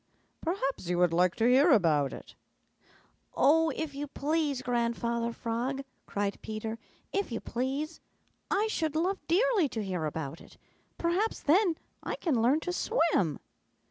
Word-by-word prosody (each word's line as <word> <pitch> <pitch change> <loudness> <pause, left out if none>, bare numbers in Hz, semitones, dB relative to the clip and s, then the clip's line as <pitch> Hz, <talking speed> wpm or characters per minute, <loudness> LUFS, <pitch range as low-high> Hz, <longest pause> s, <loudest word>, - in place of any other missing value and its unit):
Perhaps 275 - -2
you 180 - +1
would 175 -1 +3
like 180 +1 +3
to 225 - +1
hear 265 +6 +6
about 160 - +4
it." - - -10 1.0
"Oh, 325 +3 +5
if 315 -2 -4
you 285 +1 -4
please, 290 -2 -1
Grandfather 235 -1 0
Frog," 240 +4 -3 0.2
cried 200 0 -2
Peter. 220 +1 -5 0.3
"If 395 -8 -1
you 230 - -2
please. 275 +6 -3 0.5
I 410 +2 +2
should 320 -8 -1
love 370 +5 +1
dearly 395 - +3
to 220 -3 -3
hear 180 -5 -2
about 155 0 -4
it. - - -16 0.4
Perhaps 360 +6 0
then 340 +2 +4 0.2
I - - -3
can 280 -10 0
learn 265 +7 +3
to 355 - -3
swim." 330 - +1
270 Hz, 145 wpm, -30 LUFS, 220-325 Hz, 1.0 s, hear